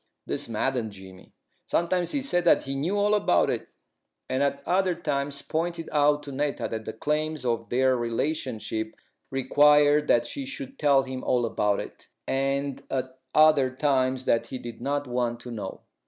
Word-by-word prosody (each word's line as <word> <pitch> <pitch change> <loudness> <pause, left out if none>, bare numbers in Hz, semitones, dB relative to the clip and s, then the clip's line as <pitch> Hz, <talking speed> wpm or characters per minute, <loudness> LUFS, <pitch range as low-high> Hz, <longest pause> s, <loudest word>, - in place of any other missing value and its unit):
This - - -3
maddened 115 -1 -1
Jimmy. 95 -1 -13 0.4
Sometimes 175 0 +1
he 280 -2 -1
said 175 -10 +1
that 175 - +4
he 135 - -4
knew 160 +9 -1
all 205 +1 +3
about 200 - +3
it, - - -3 0.6
and 130 +1 -1
at 140 0 0
other 185 0 +2
times 140 -4 -2
pointed 165 +1 -2
out 150 0 +3
to 145 - -7
Netta 145 +1 -1
that 110 -1 -4
the 110 - -5
claims 150 +3 -2
of 115 -3 -1
their 130 +1 +3
relationship 115 -3 -2 0.3
required 145 +2 +4
that 120 0 +4
she 275 - -4
should 270 0 -7
tell 140 -2 +4
him 130 -1 -6
all 120 -1 +2
about 105 -2 0
it, - - -9 0.2
and 135 0 -1
at 130 0 -3 0.2
other 155 -4 +6
times 130 -1 0
that 115 0 +2
he 130 - -5
did 120 -2 -9
not 145 +2 -1
want 120 -1 -1
to 120 - -8
know. 105 -5 -6
135 Hz, 170 wpm, -26 LUFS, 120-150 Hz, 0.6 s, other